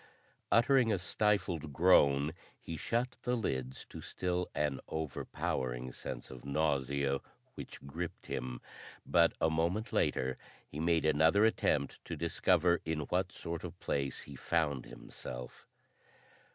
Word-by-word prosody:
Uttering 120 0 +5
a 100 - +2
stifled 90 -5 0
groan 75 -3 +5 0.3
he 85 - -6
shut 120 +9 -1
the 125 0 +1
lids 65 - -2
to - - -8
still 90 0 -2
an 75 -3 0
overpowering 65 -5 -3
sense - - -7
of 65 -2 -10
nausea 70 -1 +1 0.3
which - - -9
gripped 80 +5 -5
him, 60 -1 -4 0.4
but 85 -1 +4
a 80 - +3
moment 85 +7 0
later 65 0 +1 0.3
he 75 - -7
made 85 0 +2
another 80 +7 +5
attempt 75 -10 +1
to - - -4
discover 85 +1 +3
in 80 -1 -1
what - - +1
sort 85 -1 -5
of 90 0 -7
place 70 -1 -2
he 70 - -10
found 75 -3 0
himself. 60 0 -8
80 Hz, 130 wpm, -33 LUFS, 70-90 Hz, 0.4 s, Uttering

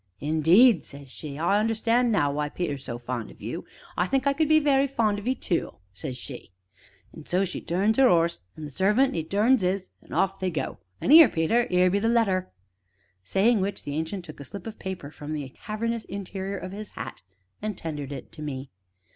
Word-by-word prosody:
'Indeed!' 165 - +5
says 140 -2 -11
she,' 145 -1 -7
I 175 +6 +2
understand 230 +2 +2
now 145 -9 +2
why 150 +1 -2
Peter 175 -1 -2
is 135 -1 -7
so 120 - -5
fond 120 -2 -5
of - - -15
you. - - -5 0.3
I 180 - +1
think 270 +6 +1
I 280 - +3
could 310 +1 +1
be 310 0 +6
very 280 -2 +3
fond 220 -6 +1
of 205 - -8
'ee 260 - +2
tu!' 180 -8 -2 0.2
says 130 +5 -6
she. 125 -3 -9 0.6
An' - - -12
so 185 +2 +2
she 185 - -5
turns 200 +8 +1
'er 265 -2 +7
'orse, 170 0 +2 0.2
an' 155 - -8
the 150 - -6
servant 210 - +2
'e 165 - -1
turns 210 +8 +3
'is 185 +1 -1
an' - - -19
off 195 0 +1
they 185 - 0
go; 160 - -4 0.2
an' - - 0
'ere, 315 -4 +10
Peter 225 +10 +1
'ere 180 0 +4
be 200 - +2
the 225 +2 +1
letter." 205 - +2 0.7
Saying 205 - +3
which, 200 +1 -3
the 145 - -5
Ancient 160 +4 -3
took 155 -3 -11
a - - -7
slip 200 +9 -8
of 225 -1 -8
paper 185 -6 -6
from 150 0 -7
the 145 -3 -4
cavernous 225 - -4
interior 195 0 -5
of 185 0 -6
his 210 +1 -7
hat - - -6 0.4
and 210 -2 -3
tendered 145 -4 -5
it 135 -2 -8
to 155 - -11
me. 135 -3 -5
190 Hz, 215 wpm, -26 LUFS, 155-225 Hz, 0.7 s, ere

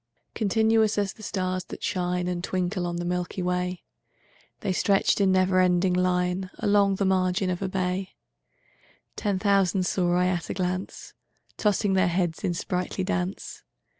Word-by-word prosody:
Continuous 220 0 +2
as 200 -2 0
the - - -16
stars 185 -3 -2
that - - -9
shine 180 -2 -1
And 175 -1 -3
twinkle 180 0 -1
on 175 - -3
the 175 0 -3
milky 180 +1 -2
way, 180 0 -2 0.8
The 190 - -1
stretched 195 +2 +2
in 195 -1 +4
never 185 0 +3
ending 180 0 +3
line 180 +1 0
Along 200 -1 +3
the 195 - 0
margin 185 0 +1
of 180 - -3
a 190 - -1
bay: 185 0 -2 1.0
Ten 205 -3 -1
thousand 195 -2 +2
saw 175 -1 +1
I 180 0 +3
at 180 -2 -1
a - - -3
glance, 185 +1 -4 0.4
Tossing 205 -1 +1
their 185 -2 +3
heads 175 -1 -1
in 180 -3 0
sprightly 180 +2 -2
dance. 185 0 -3
185 Hz, 160 wpm, -26 LUFS, 180-195 Hz, 1.0 s, in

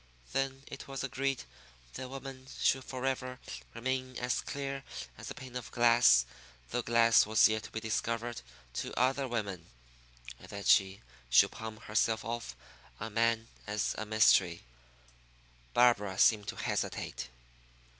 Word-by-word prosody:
Then 135 0 -1
it 135 - -9
was 135 -1 -5
agreed 135 0 -1 0.5
that 130 - -6
woman 135 -1 -8
should 130 - +2
forever 130 -1 -3 0.4
remain 130 +1 -2
as 125 0 0
clear 135 -1 -4 0.3
as - - -8
a - - -6
pane 130 -2 -10
of 125 -2 -5
glass 115 - +5 0.5
though 120 - 0
glass 115 -2 +5
was 110 0 +6
yet 110 0 -1
to - - -10
be 110 - -4
discovered 115 +1 -2 0.3
to - - -3
other 135 +2 +2
women, 100 -8 -4 0.7
and - - -14
that 100 0 -7
she 95 0 +4 0.3
should - - +6
palm 110 -1 -7
herself 110 0 0
off 115 - -4 0.4
on 110 -1 -6
man 115 0 +2 0.2
as 105 -1 -1
a 110 - -5
mystery. 100 -5 +4 1.1
Barbara 105 -6 +4
seemed 105 -1 +4
to - - -4
hesitate. - - -3
115 Hz, 140 wpm, -32 LUFS, 110-130 Hz, 1.1 s, was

